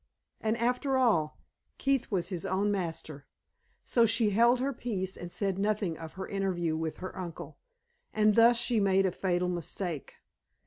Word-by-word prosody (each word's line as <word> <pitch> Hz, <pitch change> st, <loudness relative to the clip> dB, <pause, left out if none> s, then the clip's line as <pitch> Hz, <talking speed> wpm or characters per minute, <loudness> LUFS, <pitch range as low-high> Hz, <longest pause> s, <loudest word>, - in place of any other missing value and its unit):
And, 220 Hz, +1 st, 0 dB
after 250 Hz, +3 st, +1 dB
all, 175 Hz, -12 st, +2 dB, 0.4 s
Keith 270 Hz, -3 st, 0 dB
was 180 Hz, -4 st, -1 dB
his 180 Hz, -4 st, -4 dB
own 200 Hz, +2 st, 0 dB
master. 165 Hz, -6 st, -4 dB, 0.6 s
So 235 Hz, -2 st, +3 dB
she 220 Hz, -1 st, +3 dB
held 235 Hz, +4 st, +4 dB
her 275 Hz, +2 st, -1 dB
peace 195 Hz, -6 st, -3 dB
and 175 Hz, 0 st, -8 dB
said 195 Hz, -1 st, -2 dB
nothing 205 Hz, -4 st, 0 dB
of 160 Hz, 0 st, -9 dB
her 190 Hz, 0 st, -6 dB
interview 180 Hz, -5 st, -1 dB
with 160 Hz, 0 st, -3 dB
her 185 Hz, 0 st, -7 dB
uncle; 175 Hz, -3 st, -7 dB, 0.5 s
and 215 Hz, 0 st, +3 dB
thus 230 Hz, +2 st, +6 dB
she 235 Hz, -1 st, +1 dB
made 195 Hz, -1 st, +3 dB
a 185 Hz, -, +1 dB
fatal 180 Hz, 0 st, 0 dB
mistake. 175 Hz, -2 st, -4 dB
195 Hz, 165 wpm, -30 LUFS, 175-230 Hz, 0.6 s, thus